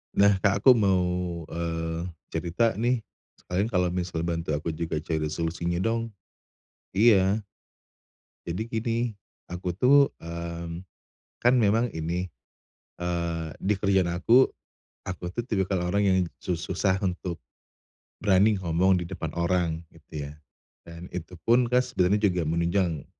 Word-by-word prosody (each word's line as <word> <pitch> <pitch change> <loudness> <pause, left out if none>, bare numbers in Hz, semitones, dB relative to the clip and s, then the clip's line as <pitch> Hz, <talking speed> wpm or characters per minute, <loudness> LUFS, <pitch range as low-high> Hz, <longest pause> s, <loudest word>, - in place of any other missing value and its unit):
Nah, 100 +1 +6
Kak, 100 +1 +1
aku 130 - +9
mau, 95 -6 +3 0.5
eee, 80 +1 -3 0.2
cerita 85 +8 +1
nih 120 0 +1 0.3
sekalian 95 +4 -2
kalau 90 -5 +1
misal 90 -2 -2
bantu 85 -2 -1
aku 80 +2 -2
juga 80 0 -3
cari 80 -2 -1
solusinya 85 +2 -2
dong. 115 0 0 0.8
Iya. 100 -1 +4 1.1
Jadi 85 +5 -3
gini, 115 0 -1 0.5
aku 90 0 -3
tuh, 140 +8 +5
mmm, 85 +1 -6 0.6
kan 120 +1 +5
memang 115 +2 +3
ini, 85 +3 -3 0.7
eee, 85 -2 -2
di 105 +2 +2
kerjaan 95 -3 +2
aku, 115 +9 +4 0.5
aku 90 -1 -6
tuh 120 - -1
tipikal 95 -5 -1
orang 100 +1 +2
yang 95 -1 +4 0.2
su 90 - -2
susah 95 +3 0
untuk 90 -2 -2 0.8
berani 100 +1 +4
ngomong 90 +1 +2
di 90 - -3
depan 85 -3 -5
orang 85 -1 0
gitu 80 -2 -8
ya. - - -10 0.5
Dan 85 +1 -9
itupun 90 +8 +1
kas 125 +1 +1
sebenarnya 100 +4 +2
juga 90 -1 -1
menunjang 85 0 0
90 Hz, 130 wpm, -27 LUFS, 85-100 Hz, 1.1 s, aku